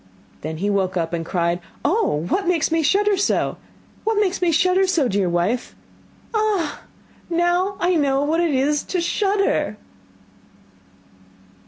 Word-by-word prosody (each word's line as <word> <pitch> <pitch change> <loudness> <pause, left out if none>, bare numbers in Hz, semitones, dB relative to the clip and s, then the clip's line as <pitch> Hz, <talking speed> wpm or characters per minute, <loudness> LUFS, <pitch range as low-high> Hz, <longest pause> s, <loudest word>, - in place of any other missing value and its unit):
Then 160 +1 -5
he 195 +5 -2
woke 190 -2 0
up 165 0 -2
and 165 -1 -1
cried: 170 0 -1 0.3
'Oh, 290 - +1
what 385 - -1
makes 335 -3 +1
me 325 0 +2
shudder 405 +6 +3
so? 390 - 0 0.5
what 440 -1 +1
makes 385 -3 0
me 350 -2 +3
shudder 365 +4 +3
so, 335 -8 +2
dear 195 -4 0
wife? 175 +8 -1 0.6
Ah! 420 -8 0 0.5
now 350 +3 +1
I 355 +1 +2
know 275 -2 +2
what 320 +3 +1
it 340 - +1
is 285 +3 +1
to 370 - -2
shudder! 390 - 0
330 Hz, 145 wpm, -21 LUFS, -, 0.6 s, shudder